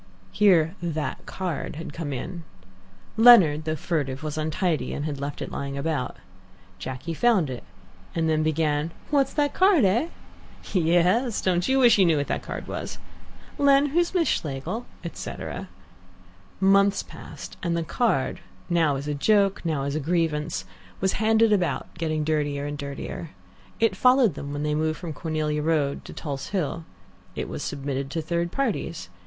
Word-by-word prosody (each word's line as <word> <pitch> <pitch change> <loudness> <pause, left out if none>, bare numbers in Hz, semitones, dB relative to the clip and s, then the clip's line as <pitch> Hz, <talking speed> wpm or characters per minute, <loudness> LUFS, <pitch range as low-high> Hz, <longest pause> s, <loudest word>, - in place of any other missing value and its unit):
Here 175 -6 +4
"that 160 -3 -3
card" 175 -8 -4
had 160 - -7
come 165 -4 -4
in. 170 +6 -5 0.7
Leonard, 190 -11 +7
though 155 0 -1
furtive, 145 -4 -2
was 155 -1 -3
untidy, 155 +2 -1
and 145 -1 -3
left 140 +1 -4
it - - -7
lying 140 0 -4
about. 140 -3 -2 0.6
Jacky 130 - -5
found 190 - +2
it, 125 - -6 0.5
and 165 -1 +1
then 155 -1 +2
began, 155 0 +1 0.2
"What's 275 -2 +3
that 290 -1 +1
card, 370 - +5
eh?" 230 - +2 0.7
"Yes, 180 +7 +3
don't 180 -1 +1
you 265 - +3
wish 240 -5 +6
you 190 - +6
knew 160 -2 +3
what 145 - 0
that - - -1
card - - -6
was?" - - -5 0.6
"Len, 280 0 +5
who's 345 +5 +1
Miss 335 -3 +3
Schlegel?" 150 - -2 0.2
etc. 170 - -6 0.9
Months 200 +1 +4
passed, - - -10
and 170 -1 0
the 165 - -1
card, 160 - 0 0.3
now 165 -4 +3
as 140 +2 -5
a 150 - -1
joke, 195 +6 +2
now 155 -5 -1
as 140 0 -2
a 155 - -1
grievance, 155 - -1 0.3
was 190 0 +1
handed 220 0 +4
about, 185 -4 -1
getting 155 -2 -1
dirtier 145 -2 -1
and 145 0 -3
dirtier. 140 +3 -6 0.5
It 225 -4 +3
followed 250 -1 +5
them 140 - -6
when 145 0 -3
they 150 0 0
moved 155 0 0
from 170 -3 -6
Cornelia 155 -2 -2
Road 150 -3 0
to - - -9
Tulse 140 -4 -5
Hill. 165 -4 -2 0.5
It - - -3
was - - -5
submitted 135 -1 -3
to 165 +3 -2
third 170 +1 -1
parties. 195 - -2
165 Hz, 160 wpm, -25 LUFS, 150-195 Hz, 0.9 s, Leonard